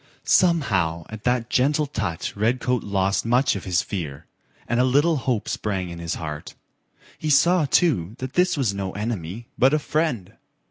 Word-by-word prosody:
Somehow 95 - +2
at 110 -1 -9
that 125 -1 0
gentle 145 +4 +2
touch 105 - -4
Redcoat 120 +3 0
lost 100 -1 0
much 125 +3 +2
of 95 - -6
his 90 +1 +1
fear, 80 -9 -5 0.4
and 120 - 0
a - - +5
little 145 +6 +3
hope 125 -5 -1
sprang 95 -4 -2
in 85 - -8
his 85 -1 -3
heart. 75 -2 -6 0.6
He 155 - -2
saw, 165 +4 +4
too, 120 - +1
this 170 +8 0
was 125 -8 +1
no 95 -1 -4
enemy, 105 -1 -4
but 135 +4 +5
a - - +3
friend. 145 - -1
115 Hz, 165 wpm, -23 LUFS, 95-135 Hz, 0.6 s, a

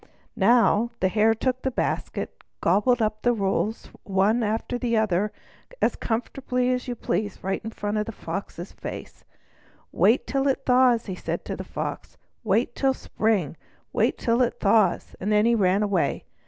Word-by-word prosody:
Now, 230 +1 +4
the 185 - +2
Hare 220 +3 +3
took 255 +3 -1
the 265 - 0
basket 255 - -2
and - - -42 0.2
gobbled 215 +7 +3
up 215 0 -1
the 245 - +3
rolls 205 +1 -1
one 200 +4 +2
after 225 +3 -2
the 235 -2 0
other 210 -1 +1 0.5
as - - +2
comfortably 250 +2 -1
as 250 0 -2
you 245 - -3
please, 205 -3 -2
right 195 +1 -1
before 215 -2 -4
the 225 - -6
Fox's 195 -4 -6
face. - - -8 0.7
"Wait 230 - +3
till 275 0 0
it 270 - 0
thaws," 250 -2 +4
he 190 - -4
said 180 - -4
to - - -4
the - - -6
Fox. - - -6 0.3
"Wait 225 +3 +1
till 270 +1 +1
the - - -13
spring. 205 -9 0 0.4
Wait - - +1
till 235 +1 +1
it 245 - 0
thaws!" 200 -3 +2
and 205 +3 -2
then 210 +1 +4
he 235 - +4
ran 200 -2 +3
away. 190 -8 0
220 Hz, 170 wpm, -25 LUFS, 200-245 Hz, 0.7 s, Now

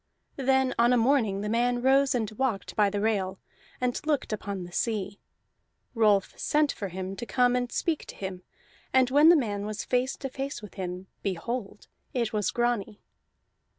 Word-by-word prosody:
Then 265 -1 +2
on 240 +1 +5
a - - +4
morning 225 -5 +2
the 210 - -3
man 240 +2 +1
rose 270 0 +4
and 220 -3 -1
walked 220 -2 -2
by 210 -2 +4
the 205 +1 -2
rail, 195 -3 0 0.4
and 250 -1 -1
looked 295 -7 0
upon 200 -3 -4
the 175 - -10
sea. 205 -1 -2 0.7
Rolf 210 -4 +3
sent 300 -1 +2
for 200 - -5
him 190 +1 -5
to - - -5
come 250 -1 +3
and 245 -1 -1
speak 325 -3 -1
to - - -9
him, 190 -2 -6 0.5
and 260 -1 +4
when 295 +4 +7
the 345 - +8
man 210 -8 -1
was 210 0 -4
face 250 +1 0
to 270 - -5
face 270 +2 -4
with 210 -2 -11
him, 180 -1 -5 0.2
behold, 205 +3 -4 0.3
it 235 -3 0
was 210 -2 +1
Grani! 235 -3 -1
230 Hz, 180 wpm, -28 LUFS, 200-255 Hz, 0.7 s, the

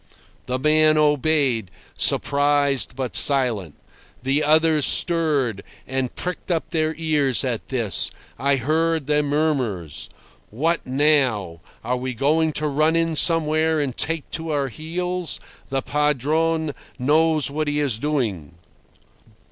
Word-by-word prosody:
The 125 0 -1
man 155 +2 +3
obeyed, 145 - +1 0.3
surprised, 140 -2 +1
but 125 -8 -4
silent. 115 - +3 0.5
The 140 +3 +1
others 155 0 +3
stirred, 145 - +1 0.2
and 130 -1 -3
pricked 180 +1 -5
up 165 -2 -2
their 160 -2 0
ears 150 -6 +1
at 125 -4 -3
this. 120 -7 +1 0.3
I 140 +1 +2
heard 160 +4 0
their 150 +1 +1
murmurs. 140 - -2 0.4
"What 160 +9 -1
now? 130 - +1 0.2
Are 125 +2 -1
we 130 0 -5
going 155 +5 +1
to 150 +1 -1
run 155 +3 +1
in 165 -1 +1
somewhere 160 -1 +3
and 135 -4 -2
take 165 -2 -2
to 165 0 -4
our 140 -3 -1
heels? 180 +4 -3 0.3
The 135 -1 -2
Padrone 150 +2 0 0.2
knows 155 +2 +2
what 155 +1 -2
he 145 0 -1
is 135 -7 +1
doing." 115 - -3
145 Hz, 125 wpm, -22 LUFS, 130-155 Hz, 0.5 s, man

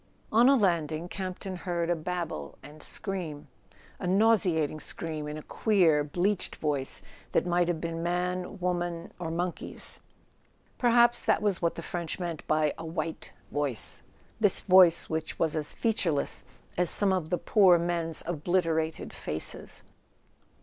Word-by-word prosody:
On 235 +4 +6
a 275 - +6
landing 170 - +1
Campton 185 0 -5
heard 175 -2 -2
a - - +2
babble 165 - -4
and 150 +2 -12
scream: 175 -7 -5 0.5
a 180 - -3
nauseating 180 -7 +3
scream 155 -1 -5
in 150 +1 -5
a 155 - -8
queer 175 -9 +3
bleached 180 +7 -1
voice 145 -3 -1 0.3
that - - +2
might 175 0 +2
have 175 -2 -1
been 165 0 -4
man, 180 +2 -2
woman 175 -2 -2
or 170 -2 -3
monkey's. 175 +2 -2 0.8
Perhaps 240 0 +4
that - - +2
was 200 -4 +1
what 170 -1 0
the 165 - -6
French 170 -3 -4
meant 170 -4 -5
by 155 -1 +2
"a - - -6
white 160 0 -4 0.2
voice": 145 -6 0 0.4
this 205 -4 +4
voice 180 -3 +6
which 160 0 -3
was 160 -1 0
as 150 -2 +2
featureless 185 -11 0 0.3
as 180 -2 +2
some 200 -2 +2
of 175 -4 -2
the 180 - +1
poor 190 -4 +5
men's 170 -1 +1
obliterated 165 -1 -1
faces! 75 +1 -4
175 Hz, 145 wpm, -28 LUFS, 160-185 Hz, 0.8 s, On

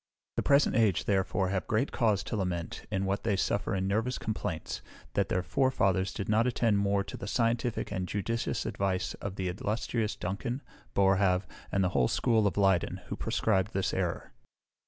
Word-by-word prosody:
The - - +1
present 140 0 +4
age, 110 -6 +3
therefore, 95 -1 +1
have 95 -1 -1
great 110 +6 +1
cause 110 -5 +2
to - - -4
lament, 90 -4 -3
in 95 -2 -1
what 100 +1 0
they 110 -3 +2
suffer 100 +1 0
in 95 0 0
nervous 110 +6 0
complaints, 95 -7 -3 0.3
that - - +1
their 90 - +1
forefathers 95 -5 +2
did 100 - -4
not 110 +3 +3
attend 115 -4 +2
more 100 0 +2
to - - -8
the - - -6
scientific 115 +1 0
and 95 -3 -2
judicious 110 +4 -2
advice 95 -2 -1
of 100 -1 -4
the 95 -1 -2
illustrious 105 +4 -1
Duncan, 120 +8 -3 0.3
Boerhaave, 95 -1 +3 0.3
and 100 - +2
the 90 - +2
whole 65 -7 +2
school 110 - +2
of 100 - -2
Leyden, 95 -2 +2
who - - -2
proscribed 110 -3 0
this 95 -1 0
error. - - -2
100 Hz, 175 wpm, -30 LUFS, 95-110 Hz, 0.3 s, present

